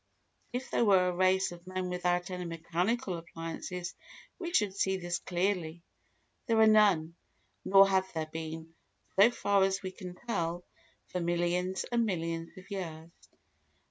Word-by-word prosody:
If 250 +2 -4
there - - +2
were 190 -4 +5
a 180 - -3
race 185 +1 +3
of 175 +1 -12
men 185 0 -3
without 180 0 -1
any 180 0 -4
mechanical 175 +4 -1
appliances 170 +2 -6 0.5
we 345 -2 -4
should 210 - +2
see 190 -1 +1
this 175 -1 -3
clearly. 175 -2 -1 0.6
There 230 -2 +2
are 220 - +7
none, 200 -7 +4 0.5
nor 195 0 +7
have 190 -1 +1
there 160 -1 -2
been, 160 +1 -7 0.4
so 200 +4 +7
far 200 -4 +1
as 195 +1 0
we 185 - -4
can 180 -2 -9
tell, 175 -5 -3 0.5
for 180 - -2
millions 175 +2 0
and 235 -1 +3
millions 165 -5 -3
of 185 +3 -13
years. 165 -4 -5
180 Hz, 150 wpm, -31 LUFS, 170-195 Hz, 0.6 s, are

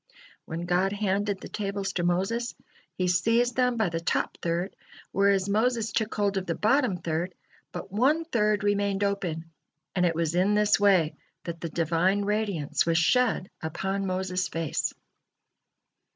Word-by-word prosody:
When 165 +2 -5
God 180 +2 +1
handed 205 -1 -1
the - - -7
tables 200 -1 -3
to 175 - -1
Moses, 195 +8 0 0.4
He 185 - 0
seized 230 +7 +2
them 250 -2 +2
by 220 -5 +2
the 165 0 -2
top 170 - -1
third, 175 +3 -2 0.4
whereas 195 -1 +3
Moses 225 +2 +1
took 220 0 -1
hold 205 -1 +1
of 190 - -3
the 165 - -1
bottom 230 -3 +2
third, 170 +2 -3 0.4
but - - -6
on 280 +10 +2
third 210 -8 +1
remained 205 -1 +1
open, 170 -5 -2 0.4
and 180 - +2
it 170 -2 +2
was 165 -1 0
in 190 +4 +3
this 210 -1 +3
way 190 -6 +4 0.3
that 170 -1 -6
the 165 - -3
Divine 170 +5 +1
radiance 205 -8 0
was 165 -1 +1
shed 220 +2 +2
upon 195 +5 -2
Moses' 185 0 -1
face. 165 -3 -2
195 Hz, 155 wpm, -27 LUFS, 175-210 Hz, 0.4 s, way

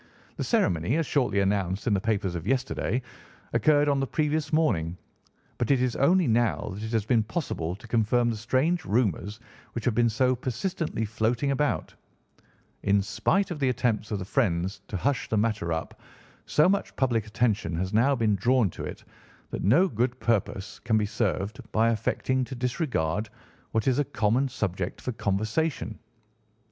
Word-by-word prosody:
The - - -3
ceremony, 85 - +1
as 165 - +1
shortly 125 -9 +1
announced 95 -1 0
in 110 - +2
the 100 - +1
papers 100 -4 0
of 85 +1 -5
yesterday, 130 -1 0 0.5
occurred 150 -1 +4
on 140 -1 +2
the 135 - 0
previous 155 0 0
morning; 90 - +1 0.6
but 120 - 0
it 135 -2 +4
is 125 -1 0
only 175 +6 +4
now 115 -3 +1
that 100 - -7
it 110 0 -4
has 110 -3 0
been 115 0 +3
possible 105 - -3
to 115 +4 -14
confirm 120 +1 +2
the - - -3
strange 130 +10 +1
rumours 105 -1 0 0.3
which 115 - -4
have 125 - +2
been 120 +1 +3
so 130 +3 +2
persistently 130 - -2
floating 115 +6 0
about. 145 +1 0 0.9
In 100 0 +2
spite 190 - 0
of 160 - -4
the 135 -2 +2
attempts 120 -4 0
of 105 - -1
the 95 - -5
friends 95 -5 0
to 100 - -3
hush 135 +6 -1
the 110 - +1
matter 105 -5 0
up, 80 0 -4 0.5
so 150 - +4
much 200 +1 0
public 115 -5 +1
attention 105 -6 0
has 95 +4 -2
now 130 +6 +4
been 110 -4 +2
drawn 115 0 +2
to - - -7
it - - -7 0.5
that - - -4
no 145 - +5
good 125 - -1
purpose 100 -3 -1
can 110 - +1
be 105 - +1
served 105 -1 -2
by 115 +1 +3
affecting 130 +3 0
to 130 - -7
disregard 120 - -1 0.4
what 110 +1 -1
is 130 +1 +3
a - - +4
common 120 +5 +1
subject 95 -7 -3
for 125 - -3
conversation. 110 +5 -1
115 Hz, 175 wpm, -27 LUFS, 105-130 Hz, 0.9 s, no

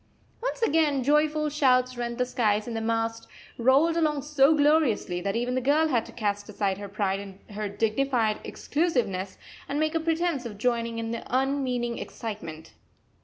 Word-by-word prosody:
Once - - -2
again 300 - +2
joyful 300 +2 +2
shouts 255 -4 +2
rent 235 -1 -4
the 250 - +1
skies, 215 -4 +1
and 235 - -4
the 225 - -2
mast 225 0 -1 0.3
rolled 275 +7 +4
along 305 -4 +1
so 295 +1 +4
gloriously 290 - +2
that 195 +3 -2
even 245 +2 -1
the 255 - 0
girl 300 +5 +3
had 240 -5 +1
to - - -11
cast 205 -2 -2
aside 200 -2 -1
her 200 -1 -7
pride 195 -1 -1
and 195 -1 -10
her 210 0 -3
dignified 225 +2 0
exclusiveness 240 - -1 0.3
and 285 - -1
make 310 0 +1
a 325 - +1
pretence 325 -3 0
of 220 -4 -7
joining 230 0 0
in 225 0 -3
the 230 - -3
unmeaning 255 -2 0
excitement. 165 -8 -7
245 Hz, 170 wpm, -27 LUFS, 215-290 Hz, 0.3 s, rolled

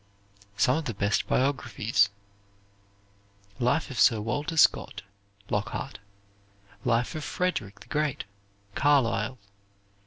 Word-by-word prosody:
Some 125 +8 +3
of 160 - -3
the 120 - -3
Best 100 +1 0
Biographies 120 -6 +1 1.5
"Life 130 +5 +1
of 130 - -5
Sir 115 - +5
Walter 145 +9 -3
Scott," - - +3 0.5
Lockhart. 105 +5 -3 0.8
"Life 120 0 +1
of 155 - -5
Frederick 115 - -2
the - - -12
Great," 150 -2 -1 0.5
Carlyle. 130 -4 +2
125 Hz, 100 wpm, -27 LUFS, 110-145 Hz, 1.5 s, Sir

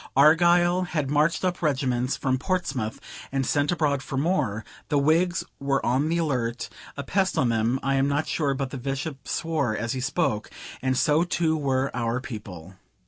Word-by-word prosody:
Argyle 175 +5 +5
had 150 -6 -2
marched 155 +5 +2
up 180 -1 -1
regiments 130 -4 0
from 130 -1 0
Portsmouth, 135 - -2 0.3
and 135 -1 0
sent 145 +4 +1
abroad 150 -5 +1
for 135 0 -5
more; 135 - 0 0.2
the 145 - +2
Whigs 165 +5 +2 0.2
were 140 0 0
on 135 +6 +1
the 170 - +1
alert, 125 -7 -1 0.3
a 140 - -3
pest 190 +5 0
on 130 -6 +3
them, 115 +3 +1
(I 135 - +1
am 135 0 +2
not 145 +2 0
sure 140 -4 0
but 135 -1 -3
the 135 - -5
Bishop 135 +1 -4
swore 150 -9 -1
as 115 +1 -2
he 130 - -3
spoke,) 135 -5 -1 0.3
and 130 -1 0
so 150 +4 +3
too 170 -2 +1
were 135 -3 0
our 120 0 -1
people. 100 -8 -8
140 Hz, 180 wpm, -25 LUFS, 130-160 Hz, 0.3 s, Argyle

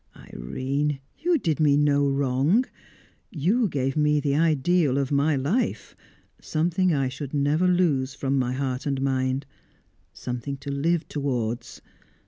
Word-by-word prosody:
Irene, 135 - -3 0.2
you 340 +2 +2
did 165 - -1
me 145 -2 +4
no 145 -1 +3
wrong. 140 - +2 0.6
You 195 - +1
gave 135 -5 -2
me 150 -1 +3
the 140 -1 0
ideal 155 -1 +2
of 140 -1 -1
my 145 +2 +2
life 150 - -1 0.5
something 175 +3 0
I 135 -4 +1
should 135 +2 -6
never 145 +5 +2
lose 150 -7 +1
from 135 -1 0
my 125 -1 0
heart 130 +1 -3
and 140 -1 -1
mind 130 0 0 0.7
something 125 +9 -5
to 140 +1 -6
live 160 +4 0
towards! 125 -5 -3
140 Hz, 135 wpm, -25 LUFS, 135-155 Hz, 0.7 s, me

